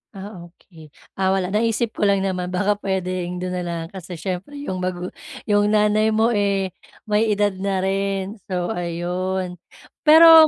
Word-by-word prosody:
Ah, 190 -3 -8
okey. 165 -2 -17 0.3
Ah, 190 0 +3
wala 190 -1 -1
naisip 225 +2 +1
ko 205 - +1
lang 200 -1 +3
naman 185 -2 -1
baka 205 +3 0
puwedeng 185 -2 -2
do'n 185 - -2
nalang 170 -2 -3
kasi 185 -2 -8
siyempre 185 - -5
yung 185 -9 -3
magu 180 0 -3 0.3
yung 205 -1 +3
nanay 215 +1 +3
mo, 225 +2 +3
eh, 200 -3 +1 0.3
may 215 +1 +2
edad 205 -1 +2
na 190 -1 0
rin 195 +1 -1
so 180 -1 -1
ayun. 180 0 -2 0.5
Pero 320 0 +10
190 Hz, 155 wpm, -22 LUFS, 180-210 Hz, 0.5 s, Pero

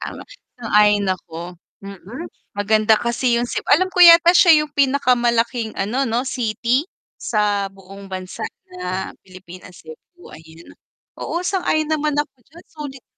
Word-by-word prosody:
tama, - - -7 0.3
sang-ayon 210 -3 +2
ako. 175 -1 -7 0.3
Mm, 200 - -9 0.3
maganda 215 +2 +3
kasi 235 +1 0
yung 240 - 0
Ceb - - -4
alam 370 +6 +3
ko 360 - -1
yata 340 0 +8
siya 330 -4 +6
yung 295 - -14
pinakamalaking 240 -4 +1
ano 245 +7 -1
'no 235 +3 -1
city, 245 +3 -1 0.3
sa 205 -2 0
buong 195 +1 -13
bansa 185 -1 -7 0.3
na 185 +1 -4
Pilipinas, 185 -1 -14
Cebu, 160 - -15
ayan. 160 +1 -15 0.5
Oo 345 - -3
sang-ayon 355 -5 -1
naman 305 -1 0
ako 295 -2 -2
diyan 330 +5 -17
sulit 285 -4 -9
235 Hz, 135 wpm, -20 LUFS, 195-290 Hz, 0.5 s, yata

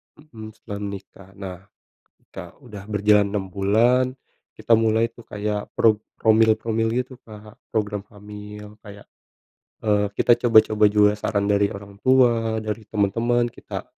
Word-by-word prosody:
ta - - -19
mhm, 110 -1 -9
setelah 105 -3 -8
nikah. 100 -1 -9
Nah, 95 -3 -7 0.8
Kak, 90 -2 -10
udah 105 -7 -11
berjalan 105 0 +3
6 100 -2 -3
bulan, 110 +7 +2 0.5
kita 115 - +1
mulai 115 +1 +2
tuh 120 - -14
kayak 105 0 -4
prog 110 -2 +3 0.2
promil 110 0 +4
promil 115 0 -1
gitu, 125 +2 -3
Kak, 105 -1 -13 0.2
program 105 -2 -2
hamil. 105 0 -11
Kayak, 100 -1 -13 0.8
eee, 105 -1 +2
kita 120 - +4 0.2
coba-coba 110 -1 +4
juga 105 0 +4
saran 100 -2 -1
dari 100 0 +2
orang 100 0 -11
tua, 120 -4 +3
dari 110 0 -5
temen-temen, 115 +4 0
kita - - -8
105 Hz, 140 wpm, -22 LUFS, 100-115 Hz, 0.8 s, promil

